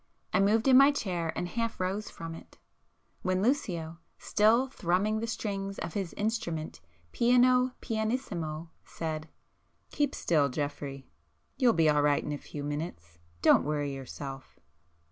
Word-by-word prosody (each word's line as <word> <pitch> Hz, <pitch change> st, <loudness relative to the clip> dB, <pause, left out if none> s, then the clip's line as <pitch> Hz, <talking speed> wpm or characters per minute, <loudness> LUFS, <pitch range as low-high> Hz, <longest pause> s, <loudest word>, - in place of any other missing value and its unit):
I 185 Hz, -, +4 dB
moved 215 Hz, +5 st, +3 dB
in 260 Hz, -1 st, +8 dB
my 275 Hz, +1 st, +7 dB
chair 175 Hz, -, -2 dB
and 175 Hz, -, -2 dB
half 230 Hz, +5 st, -3 dB
rose 195 Hz, +3 st, -2 dB
from 165 Hz, 0 st, -7 dB
it,—when 185 Hz, +3 st, -6 dB
Lucio, 175 Hz, -, -1 dB, 0.2 s
still 225 Hz, +5 st, +3 dB
thrumming 210 Hz, -1 st, 0 dB
the 230 Hz, -, -3 dB
strings 195 Hz, -3 st, -3 dB
of 170 Hz, -, -5 dB
his 195 Hz, -4 st, -3 dB
instrument 170 Hz, -, -3 dB, 0.3 s
piano 250 Hz, -, +4 dB
pianissimo, 200 Hz, -, -3 dB
said— 155 Hz, -1 st, -5 dB, 0.6 s
"Keep 290 Hz, -2 st, 0 dB
still, 150 Hz, -4 st, +2 dB
Geoffrey! 140 Hz, -1 st, -4 dB, 0.5 s
You'll 250 Hz, -3 st, +4 dB
be 165 Hz, -4 st, +3 dB
all 150 Hz, -1 st, +4 dB
right 145 Hz, -1 st, +2 dB
in -, -, -4 dB
a 145 Hz, -, -3 dB
few 145 Hz, -, -7 dB
minutes. 145 Hz, -, -5 dB, 0.2 s
Don't -, -, +6 dB
worry 145 Hz, -1 st, -1 dB
yourself." 135 Hz, 0 st, -8 dB
180 Hz, 140 wpm, -30 LUFS, 155-225 Hz, 0.6 s, in